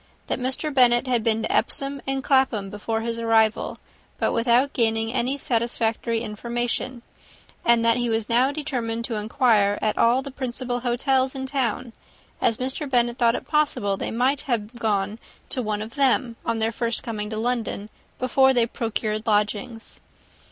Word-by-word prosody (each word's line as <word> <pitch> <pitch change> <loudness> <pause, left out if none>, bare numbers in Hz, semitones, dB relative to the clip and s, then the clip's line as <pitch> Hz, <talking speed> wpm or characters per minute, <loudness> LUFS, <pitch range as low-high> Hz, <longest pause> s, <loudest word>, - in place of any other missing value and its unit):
That - - -2
Mr. 265 +4 -2
Bennet 245 -2 +4
had 245 -3 +1
been 225 -1 +1
to - - -1
Epsom 275 0 +1
and 270 0 -1
Clapham, 260 -8 +2
before 225 +2 -3
his 230 0 -3
arrival, 225 -1 +2 0.4
but - - +1
without 240 +4 +3
gaining 225 -1 +1
any 260 +2 0
satisfactory 230 -2 0
information; 240 +2 -3 0.6
and 235 -1 +4
that 230 +1 +4
he 240 -1 0
was 225 -1 0
now 250 +4 +3
determined 240 -6 -3
to 235 - -4
inquire 210 -2 +2
at 215 - -1
all 245 +3 +4
the 275 - -7
principal 250 -1 -3
hotels 260 +2 +1
in 265 0 -4
town, 255 -3 -2 0.5
as 225 - +2
Mr. 265 +3 -3
Bennet 240 -1 +1
thought 235 -1 +4
it - - -5
possible 290 -10 +1
they - - -4
might 260 +5 +1
have 225 -2 -1
gone 215 -2 -1 0.3
to 255 - -1
one 215 -2 -2
of 220 +2 -10
them, 255 -4 +2
on 230 0 -1
their 225 0 0
first 230 +1 -2
coming 215 -3 -4
to 215 - -4
London, 225 -3 -2 0.3
before 265 +1 +3
they 240 -2 +4
procured 220 -1 -3
lodgings. 210 +2 -1
235 Hz, 165 wpm, -24 LUFS, 225-255 Hz, 0.6 s, Bennet